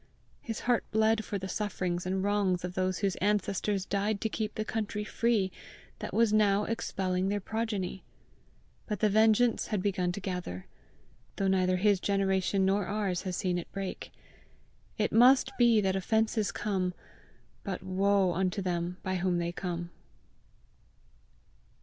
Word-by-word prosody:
His 225 -2 -5
heart 245 -1 +2
bled 220 0 +2
for 205 - -3
the 190 0 -5
sufferings 185 -4 -2
and 190 +1 -1
wrongs 200 -3 +1
of 180 - -5
those 185 0 0
whose 195 -3 0
ancestors 200 -1 0
died 200 +2 -1
to 220 - 0
keep 215 0 -3
the 215 - -2
country 210 -1 -3
free 210 -3 +1 0.5
that - - -5
was 230 -2 +3
now 205 -1 +4
expelling 190 -4 -1
their 205 0 0
progeny. 205 -3 -3 0.8
But 210 - -3
the 215 -2 +3
vengeance 220 +2 +3
had 210 -4 -1
begun 185 -3 0
to 200 - -4
gather, 180 - -5 0.7
though 195 - 0
neither 185 -1 +2
his 200 0 +3
generation 195 0 +1
nor 195 0 +1
ours 200 -3 -1
has 180 - -3
seen 180 -2 0
it 170 - -9
break. 195 -1 -5 0.9
It 210 - 0
must 255 +4 +6
be 235 -2 +6
that 190 -1 +1
offences 215 0 +1
come, 185 -3 -2 0.7
but 190 -3 -4
woe 190 0 +2
unto 185 +2 0
them 175 0 -2
by 185 -1 -1
whom 180 0 0
they 170 0 -1
come! 175 -1 -4
195 Hz, 150 wpm, -30 LUFS, 185-215 Hz, 0.9 s, must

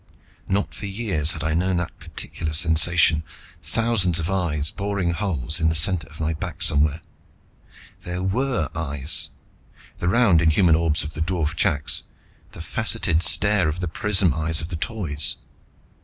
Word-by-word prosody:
Not 100 +2 -1
for 100 - -7
years 95 -7 0
had 80 - -6
I 80 0 0
known 90 +2 0
that 90 -1 -5
particular 80 -2 -5
sensation 80 -1 +3 0.4
thousands 110 -7 +1
of 85 +2 -2
eyes, 80 -5 0
boring 100 -3 -2
holes 85 - -2
in 80 -1 +2
the 80 - -1
center 80 0 +2
of 80 +2 -13
my 80 0 -1
back 80 - -5
somewhere. 75 +2 +2 1.0
There 90 +1 -5
were 115 - -1
eyes; 70 -1 -1 0.7
the 90 - 0
round 100 -6 +4
inhuman 85 +1 +3
orbs 80 -2 +1
of 75 +1 -7
the 80 - -6
dwarf 80 -2 -1
chaks, 75 -2 0 0.5
the - - -9
faceted 80 +1 +1
stare 95 0 +4
of 80 +3 -4
the 90 - -2
prism 95 -1 +3
eyes 80 +2 0
of 80 +2 -5
the 85 - -4
Toys. 80 - -2
85 Hz, 155 wpm, -22 LUFS, 80-95 Hz, 1.0 s, round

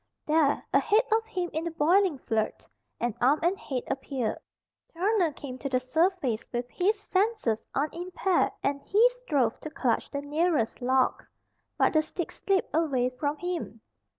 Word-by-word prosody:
There, 305 -2 +2
ahead 440 +2 +4
of 445 0 +1
him 365 -6 -3
in 315 - -1
the 335 - -2
boiling 335 +1 +3
flood, 220 -4 -2 0.3
an 240 -2 0
arm 270 +5 +4
and 350 +3 +3
head 265 -9 -4
appeared. 265 -3 -2 0.6
Turner 370 -1 +2
came 260 -3 -8
to 275 - -3
the 255 -1 +2
surface 295 - 0
with 240 0 -2
his 405 +4 +1
senses 395 - 0
unimpaired 350 +5 0
and 280 0 0
he 440 - +4
strove 295 - -1
to 310 - -7
clutch 250 -6 0
the 280 - -3
nearest 295 -4 0
log. 260 +1 +2 0.5
But - - +3
the 310 - +5
stick 330 +2 -5
slipped 390 -1 -1
away 275 -6 +2
from 285 +3 -2
him. 345 -10 -4
310 Hz, 155 wpm, -28 LUFS, 260-365 Hz, 0.6 s, the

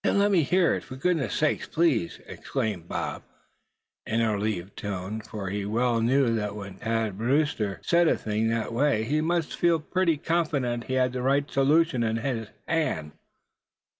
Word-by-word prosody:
"Then - - +2
let 200 +1 +3
me 185 -4 +4
hear 175 +4 +3
it, - - -3
for 130 - -9
goodness 140 - 0
sake, 155 -1 0
please!" 155 - +1
exclaimed 100 -6 -3
the - - -5
other, - - -3 0.8
in 110 - 0
a 110 -1 +2
relieved 100 -2 -3
tone; 100 +2 -4
for 100 -3 -6
he 100 0 -2
well 115 +3 +1
knew 125 +1 +3
that 105 -1 -3
when 100 -2 -8
Thad 110 -3 -1
Brewster 120 - 0
said 170 0 +3
a - - +3
thing 110 +1 -1
that 115 0 -1
way, 125 -3 +2
he 150 +7 0
must 165 0 0
feel 170 -2 +3
pretty 170 +1 +1
confident 145 -8 -1
he 130 - -4
had 125 -1 +2
the 125 - -3
right 140 +2 +2
solution 140 -1 +3
in 110 -1 0 0.5
hand. 115 - -1
125 Hz, 175 wpm, -27 LUFS, 110-155 Hz, 0.8 s, me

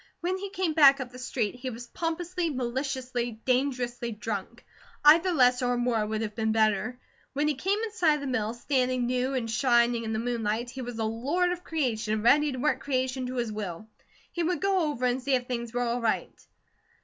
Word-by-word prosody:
When 360 +2 0
he 400 +1 -5
came 375 -4 -1
back 280 -3 +7
up 250 -2 -5
the 250 - -11
street, 235 -4 -2
he 250 +1 -5
was 240 0 -8
pompously, 335 +5 -2
maliciously, 250 -3 -3
dangerously 250 -2 0
drunk. 220 +1 -5 0.4
Either 330 +5 +7
less 250 -5 +4
or 245 0 +1
more 240 -3 +1
would 215 +1 -2
have 215 -1 -4
been 220 0 0
better. 220 +3 +1 0.3
When 290 +2 +1
he 300 - +2
came 385 +9 0
in 445 0 -3
sight 345 -7 +3
of 295 - -5
the - - -4
mill, 230 -4 -1
standing 255 -1 0
new 255 +2 0
and 245 -3 -1
shining 235 0 +2
in 220 - -3
the 220 - -1
moonlight, 230 0 -2
he 265 - -7
was 245 -2 -6
a 225 - -1
lord 280 +12 0
of 355 0 -4
creation, 225 -8 -1
ready 290 +5 +5
to 255 - -5
work 300 +4 +1
creation 260 -1 -1
to 255 - -5
his 235 -3 -1
will. 210 -2 -5 0.4
He 345 - -3
would 345 +1 0
go 380 -5 +1
over 255 -4 -2
and 250 +1 +1
see 270 +1 +2
if 250 -1 -1
things 235 -2 -4
were 245 +1 -1
all 240 +1 -1
right. 230 - 0
250 Hz, 210 wpm, -28 LUFS, 235-290 Hz, 0.4 s, back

